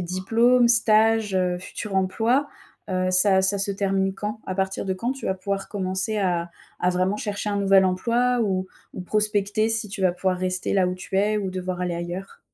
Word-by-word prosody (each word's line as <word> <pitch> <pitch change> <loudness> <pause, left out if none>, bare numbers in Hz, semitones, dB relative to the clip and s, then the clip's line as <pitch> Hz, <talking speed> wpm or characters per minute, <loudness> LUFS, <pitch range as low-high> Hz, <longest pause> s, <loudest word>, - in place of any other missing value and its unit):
diplôme, 230 +8 +2
stage, 225 -2 +3
heu, 180 -1 0
futur 195 +2 -6
emploi, 225 +9 +1 0.4
heu, 185 -1 0
ça 190 +1 +4
ça 195 +1 +1
se 200 +1 -1
termine 195 -1 0
quand? 210 +2 -5
À 185 - -3
partir 190 0 -2
de 190 - -1
quand 235 +7 -3
tu 270 0 -5
vas 190 - 0
pouvoir 195 +1 -4
commencer 190 +2 -2
à 175 -3 -1 0.3
à 180 - +1
vraiment 185 +3 0
chercher 210 -1 -3
un 205 - -1
nouvel 195 -1 +4
emploi 235 +7 +1
ou 190 -2 -2 0.3
ou - - -6
prospecter, 210 +2 +1
si 225 -1 -1
tu 195 0 -6
vas 185 -2 +3
pouvoir 180 0 -1
rester 185 0 -2
là 190 -2 +3
où 180 - -2
tu 185 +1 -5
es 210 +2 +2
ou 200 -3 -2
devoir 185 -1 -4
aller 180 -1 -2
ailleurs? 175 +3 -7
195 Hz, 200 wpm, -24 LUFS, 185-210 Hz, 0.4 s, ça